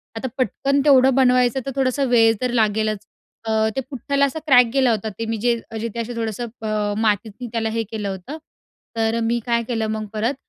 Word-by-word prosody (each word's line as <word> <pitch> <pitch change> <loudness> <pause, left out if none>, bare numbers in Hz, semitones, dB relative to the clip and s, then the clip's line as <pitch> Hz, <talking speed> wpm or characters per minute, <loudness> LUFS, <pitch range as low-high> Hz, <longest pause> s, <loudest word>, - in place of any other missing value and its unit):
आता 225 +4 -3
पटकन 275 +3 0
तेवढं 265 -2 +5
बनवायचं 250 -1 +3
तर 275 - -3
थोडासा 270 0 +1
वेळ 230 -3 +4
तर 250 -1 0
लागेलच. 215 -2 0 0.4
अ, 225 - -3 0.3
तो 265 - 0
पुठ्ठाला 280 +1 0
असा 280 +3 -3
क्रॅक 250 -3 +7
गेला 265 -3 +3
होता, 220 -1 -1
ते 230 - -2
मी 225 0 -2
जे 240 +3 +2 0.2
मी 225 - -5
जिथे 230 +1 -4
असं 235 +1 -4
थोडंसं, 230 +1 -3
अ, 210 -1 -1
मातीत 215 0 +1
मी 245 - -4
त्याला 225 -1 -1
हे 225 +1 -1
केलं 210 -3 -3
होतं. 195 - -6 0.6
तर 225 +1 +1
मी 235 +1 +1
काय 235 -1 +1
केलं, 225 -3 -1
मग 215 0 -3
परत 220 +5 0
230 Hz, 205 wpm, -21 LUFS, 220-255 Hz, 0.6 s, क्रॅक